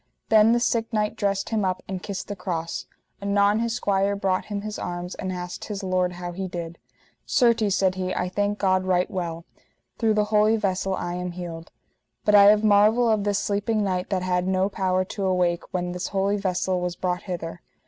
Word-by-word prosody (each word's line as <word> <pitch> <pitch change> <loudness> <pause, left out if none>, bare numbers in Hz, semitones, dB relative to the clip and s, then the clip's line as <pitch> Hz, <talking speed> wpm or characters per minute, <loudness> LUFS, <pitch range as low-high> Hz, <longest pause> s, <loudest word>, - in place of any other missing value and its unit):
Then 220 0 +6
the 240 - +3
sick 230 -1 0
knight 210 -2 0
dressed 200 -1 -1
him 220 -2 0
up 185 -1 -1
and 190 -1 -4
kissed 195 -1 -5
the 205 - -4
cross; 170 -4 -4 0.3
anon 200 +1 +2
his 230 0 -1
squire 200 -1 +1
brought 190 -2 0
him 205 -1 -4
his 210 0 -5
arms, 175 +1 -4
and 190 -1 -4
asked 180 -1 -6
his 205 -2 -5
lord 185 -1 0
how 175 0 -6
he 190 +2 -4
did. 170 -1 -6 0.5
Certes, 225 -5 +3
said 190 -1 +2
he, 185 0 -3
I 180 - -1
thank 205 +2 -1
God 185 -2 +2
right 185 0 +1
well, 170 -3 -4 0.5
through 220 -2 +2
the 210 - +3
holy 215 +1 +5
vessel 190 -2 -1
I 175 -1 -4
am 180 0 -4
healed. 170 -2 -7 0.6
But 210 - +3
I 200 -1 +9
have 210 +1 +6
marvel 215 +3 +5
of 210 -2 +1
this 205 -1 +1
sleeping 205 +2 0
knight 185 -2 -1
that 190 -3 -1
had 180 0 0
no 190 +1 +1
power 185 -2 0
to 200 +1 -5
awake 180 -2 0
when 180 -1 -2
this 180 0 -4
holy 200 +1 0
vessel 185 -2 -1
was 180 -1 -2
brought 180 -1 -2
hither. 170 -2 -6
190 Hz, 205 wpm, -24 LUFS, 180-205 Hz, 0.6 s, I